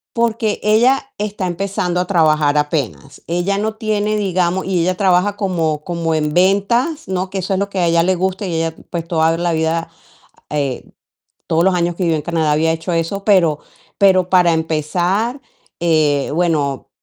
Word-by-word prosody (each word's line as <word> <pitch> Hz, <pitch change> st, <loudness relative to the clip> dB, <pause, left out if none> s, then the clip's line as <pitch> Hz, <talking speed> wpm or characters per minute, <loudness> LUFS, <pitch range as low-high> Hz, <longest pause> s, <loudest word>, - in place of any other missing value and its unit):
Porque 230 Hz, -2 st, 0 dB
ella 250 Hz, +6 st, +2 dB
está 205 Hz, -2 st, -3 dB
empezando 180 Hz, 0 st, -2 dB
a 180 Hz, -, 0 dB
trabajar 155 Hz, -5 st, +2 dB
apenas, 145 Hz, -2 st, -3 dB
ella 175 Hz, +4 st, -1 dB
no 215 Hz, +1 st, -2 dB
tiene, 215 Hz, -1 st, -1 dB
digamos 185 Hz, -2 st, 0 dB
y 185 Hz, -2 st, 0 dB
ella 185 Hz, +2 st, 0 dB
trabaja 190 Hz, +1 st, +2 dB
como 165 Hz, -6 st, -1 dB
como 170 Hz, -2 st, -2 dB
en 150 Hz, -1 st, -1 dB
ventas, 205 Hz, -, +1 dB
¿no?, 185 Hz, 0 st, -2 dB
que 195 Hz, -, -3 dB
eso 190 Hz, +1 st, -2 dB
es 190 Hz, -, 0 dB
lo 200 Hz, 0 st, -1 dB
que 195 Hz, -, -3 dB
a 175 Hz, -, +2 dB
ella 165 Hz, 0 st, +3 dB
le 185 Hz, +2 st, +2 dB
gusta, 190 Hz, +3 st, -2 dB
y 180 Hz, -, -3 dB
ella, 165 Hz, 0 st, -1 dB, 0.2 s
pues, 170 Hz, -2 st, -4 dB
toda 165 Hz, -1 st, +2 dB
la 170 Hz, 0 st, 0 dB
vida, 160 Hz, +1 st, -1 dB, 0.6 s
eh, 140 Hz, -4 st, -2 dB, 0.6 s
todos 165 Hz, +1 st, +2 dB
los 190 Hz, +1 st, +3 dB
años 175 Hz, 0 st, 0 dB
que 185 Hz, -, -3 dB
vive 165 Hz, -2 st, +2 dB
en 155 Hz, -, -2 dB
Canadá 160 Hz, -2 st, 0 dB
había 160 Hz, +2 st, +2 dB
hecho 165 Hz, +2 st, -3 dB
eso, 165 Hz, +4 st, -2 dB
pero 170 Hz, -8 st, +3 dB, 0.4 s
pero 185 Hz, -2 st, +4 dB
para 180 Hz, -2 st, +4 dB
empezar, 175 Hz, -, -1 dB, 0.4 s
eh, 155 Hz, -4 st, +2 dB
bueno, 155 Hz, -5 st, -1 dB
175 Hz, 180 wpm, -18 LUFS, 160-195 Hz, 0.6 s, pero